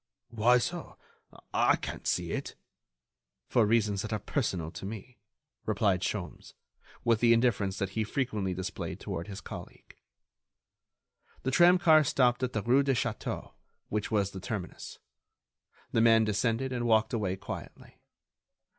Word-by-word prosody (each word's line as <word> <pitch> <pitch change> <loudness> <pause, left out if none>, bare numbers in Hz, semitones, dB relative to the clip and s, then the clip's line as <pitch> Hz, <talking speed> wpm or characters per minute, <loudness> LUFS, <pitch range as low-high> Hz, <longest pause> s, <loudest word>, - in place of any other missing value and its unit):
"Why 120 +2 +4
so? 120 - -4 0.6
I - - +4
can't - - -6
see - - 0
it." - - -4 0.9
"For 115 -4 +3
reasons 105 -3 +2
that 110 - -5
are 110 - 0
personal 95 - -2
to - - -9
me," 110 +4 -8 0.5
replied 100 -3 +2
Sholmes, 95 -5 -5 0.5
with 115 -2 +3
the 115 0 +5
indifference 110 -5 +1
that 100 -1 -2
he 110 +2 -1
frequently 105 -6 -2
displayed 95 0 -5
toward 85 +1 -5
his 100 -1 -7
colleague. - - -10 1.5
The 130 - 0
tramcar 175 -1 +6
stopped 125 -2 +2
at 125 -1 -1
the 110 - -1
rue 125 +4 +4
de 135 -1 +1
Château, 115 -2 -3 0.4
which 105 -1 -2
was 100 -3 +1
the 95 - -7
terminus. 95 -2 -6 0.9
The 115 - +2
man 115 -1 +6
descended 115 +4 0
and 120 -1 -1
walked 110 0 +3
away 100 -5 0
quietly. 95 - -9
110 Hz, 140 wpm, -30 LUFS, 100-125 Hz, 1.5 s, tramcar